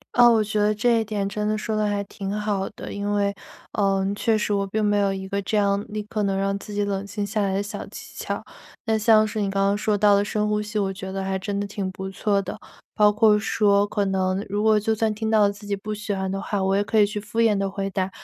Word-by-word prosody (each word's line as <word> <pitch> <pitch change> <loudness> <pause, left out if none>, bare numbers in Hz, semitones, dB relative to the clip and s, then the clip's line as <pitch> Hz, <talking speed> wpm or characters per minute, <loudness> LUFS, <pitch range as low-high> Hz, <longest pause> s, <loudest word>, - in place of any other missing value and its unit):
啊， 240 -1 +8
我 225 -2 +4
觉 210 0 -1
得 210 +1 +3
这 230 +2 +2
一 - - 0
点 210 -2 -2
真 210 +1 -3
的 215 0 0
说 215 0 -3
得 215 0 +1
还 205 -1 0
挺 195 -1 -6
好 205 -2 -1
的， - - -8
因 205 0 -2
为， 200 -1 +1 0.4
呃， 195 -2 +1
确 220 +1 +1
实 210 - -1
我 200 -1 +1
并 215 +2 -2
没 205 0 +2
有 200 -1 +2
一 190 0 -5
个 200 +1 -2
这 210 +2 -1
样 200 0 +1
立 215 0 -3
刻 210 0 -3
能 195 -1 0
让 195 0 0
自 205 +1 -9
己 205 0 0
冷 200 0 -2
静 205 0 -4
下 215 +1 -1
来 195 -1 0
的 195 - 0
小 205 0 -6
技 - - -11
巧。 - - -4 0.4
那 220 -1 +2
像 215 0 +5
是 215 0 -3
你 200 - 0
刚 195 0 +1
刚 200 +1 +2
说 210 0 +1
到 205 0 +5
了 200 - +3
深 210 0 -1
呼 210 0 0
吸， 210 0 -3
我 195 -1 -1
觉 190 0 -7
得 195 - -3
还 190 0 -1
真 200 +1 -3
的 205 - -2
挺 200 -2 -4
不 190 0 -6
错 200 +1 0
的， - - -6 0.4
包 210 0 +5
括 210 0 +4
说， 205 -1 +2
可 205 -1 -1
能 190 0 0
如 205 +1 -1
果 220 -1 +4
就 220 +1 0
算 220 0 0
听 220 +1 -3
到 220 -1 +4
了 200 -1 +4
自 205 +1 -12
己 205 - 0
不 210 +2 -5
喜 205 0 -3
欢 190 -1 -2
的 195 - -2
话， 200 -1 -2
我 195 +1 +2
也 205 - +2
可 220 - -1
以 210 - +7
去 210 +1 -4
敷 210 +3 -2
衍 220 -3 +4
地 195 0 0
回 195 0 -3
答， 190 -1 -1
205 Hz, 305 characters per minute, -24 LUFS, 195-215 Hz, 0.4 s, 啊